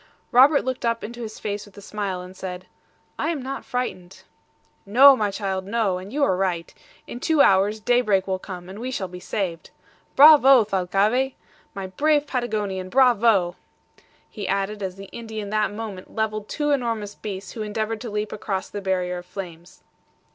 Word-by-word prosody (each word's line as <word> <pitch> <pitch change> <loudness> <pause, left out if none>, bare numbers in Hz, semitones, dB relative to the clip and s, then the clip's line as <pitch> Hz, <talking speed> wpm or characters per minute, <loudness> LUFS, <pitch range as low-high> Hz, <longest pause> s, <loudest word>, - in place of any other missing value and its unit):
Robert 275 +4 +6
looked 260 -1 -3
up 230 -1 0
into 240 +2 -7
his 220 -2 -7
face 205 -1 -4
with 205 - -19
a - - -8
smile, 195 -3 -4
and 180 +1 -12
said, 185 -1 -7 0.5
"I - - 0
am 330 -4 -2
not 270 +1 -5
frightened." 195 -8 -5 0.6
"No, 265 +7 +7
my 210 -4 0
child, 195 -2 -3
no! 205 -4 0
and 190 +2 -10
you 285 +2 0
are 190 - +3
right. 180 -3 -2 0.3
In 240 - -8
two 315 +1 +3
hours 200 +3 +3
daybreak 215 -4 +2
will 190 -1 -2
come, 180 -2 -8
and 195 +3 -9
we 250 +2 -4
shall 205 -7 -3
be 180 0 -9
saved. 180 -3 -4 0.5
Bravo, 275 -4 +8
Thalcave! 205 +7 +1 0.4
my 195 -1 -4
brave 290 +10 +1
Patagonian! 210 -8 -3
Bravo!" 225 -7 +3 0.7
he 205 -3 -7
added 200 +2 -1
as 190 -2 -4
the 195 0 -10
Indian 220 -3 -6
that 215 -1 +1
moment 205 -3 -8
leveled 215 -1 -2
two 295 -1 -1
enormous 230 -6 -1
beasts 195 -2 -7
who 225 - -7
endeavored 215 +1 -3
to 235 - -5
leap 210 0 -3
across 195 -2 -4
the 205 - -5
barrier 180 -2 -1
of 175 - -14
flames. 175 -3 -9
210 Hz, 175 wpm, -23 LUFS, 190-240 Hz, 0.7 s, Bravo